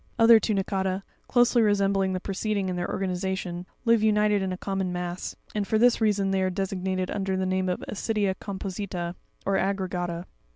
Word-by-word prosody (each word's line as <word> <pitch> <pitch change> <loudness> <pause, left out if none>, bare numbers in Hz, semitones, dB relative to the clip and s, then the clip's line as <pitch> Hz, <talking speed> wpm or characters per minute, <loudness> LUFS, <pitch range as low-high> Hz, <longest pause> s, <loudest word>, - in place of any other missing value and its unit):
29. 230 - +2
Other 230 -1 +9
Tunicata, 195 -2 -1 0.2
closely 245 0 +4
resembling 195 -2 +2
the 185 - -1
preceding 200 0 -2
in 180 - -2
their 175 0 -2
organization, 185 -1 -2 0.2
live 230 -2 +4
united 210 -1 +3
in 190 -1 -1
a 185 - -3
common 195 -1 -2
mass, 180 0 -4 0.2
and 205 -2 -1
for 220 - +2
this 240 +1 +4
reason 205 -3 +2
they 190 0 +1
are 185 - +2
designated 185 -1 -2
under 195 -1 -1
the 190 - 0
name 185 0 0
of 180 - -2
AscrpIa 210 -2 0
composITa 190 -3 -4 0.3
or 195 -1 +2
Acerscata. 180 -3 -2
195 Hz, 175 wpm, -26 LUFS, 185-205 Hz, 0.3 s, Other